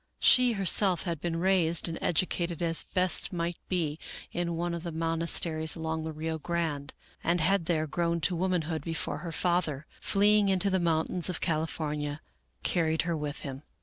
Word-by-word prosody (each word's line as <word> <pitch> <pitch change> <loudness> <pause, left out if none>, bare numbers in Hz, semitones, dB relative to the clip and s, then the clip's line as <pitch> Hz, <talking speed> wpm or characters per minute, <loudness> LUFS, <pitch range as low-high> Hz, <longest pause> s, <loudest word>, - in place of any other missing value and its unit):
She 250 -1 +5
herself 195 -1 +2
had 165 -4 -3
been 170 -1 -2
raised 175 -3 +2
and 165 - -4
educated 175 0 0
as 165 -1 +4
best 185 -1 +1
might 170 -1 -2
be 160 -4 -1 0.3
in 175 -1 -2
one 170 +1 -2
of 170 - -4
the 170 0 -5
monasteries 165 0 0
along 160 -1 -3
the 160 - -3
Rio 160 +1 -3
Grande, 155 -4 -2 0.3
and 170 +2 +2
had 185 +1 +2
there 155 -3 +1
grown 170 +2 0
to 180 - +1
womanhood 170 -3 -1
before 165 -3 -2
her 170 +1 -6
father, 160 -4 0
fleeing 205 0 +4
into 195 +1 +1
the 190 - +2
mountains 170 +1 0
of 180 - -2
California, 155 -2 -2 0.4
carried 160 -2 +1
her 170 0 -1
with 150 -1 -4
him. 135 -1 -6
170 Hz, 170 wpm, -29 LUFS, 160-180 Hz, 0.4 s, She